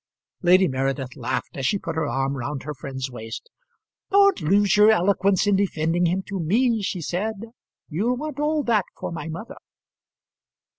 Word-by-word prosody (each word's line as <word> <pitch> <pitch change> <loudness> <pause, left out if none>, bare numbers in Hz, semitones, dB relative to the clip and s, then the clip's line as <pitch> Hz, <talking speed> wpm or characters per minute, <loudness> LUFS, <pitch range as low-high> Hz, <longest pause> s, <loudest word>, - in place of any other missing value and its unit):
Lady 185 +1 +5
Meredith 135 -1 -2
laughed 130 -1 -3
as 135 - -4
she 205 - +1
put 165 -4 -5
her 160 -2 0
arm 135 +2 -1
round 135 +2 -4
her 150 +2 -5
friend's 130 -1 -6
waist. 115 - -8 0.6
"Don't 400 -1 +4
lose 200 +4 +3
your 210 +1 +7
eloquence 195 -1 +3
in 205 -1 +3
defending 175 -3 +1
him 185 +3 0
to 195 -1 -5
me," 225 +7 +2
she 190 -2 -3
said. 190 +7 -2 0.5
"You'll 220 +11 -1
want 300 0 -5
all 300 0 +1
that 215 -7 +2
for - - -5
my 160 -2 -5
mother." 215 - -7
180 Hz, 165 wpm, -24 LUFS, 145-215 Hz, 0.6 s, your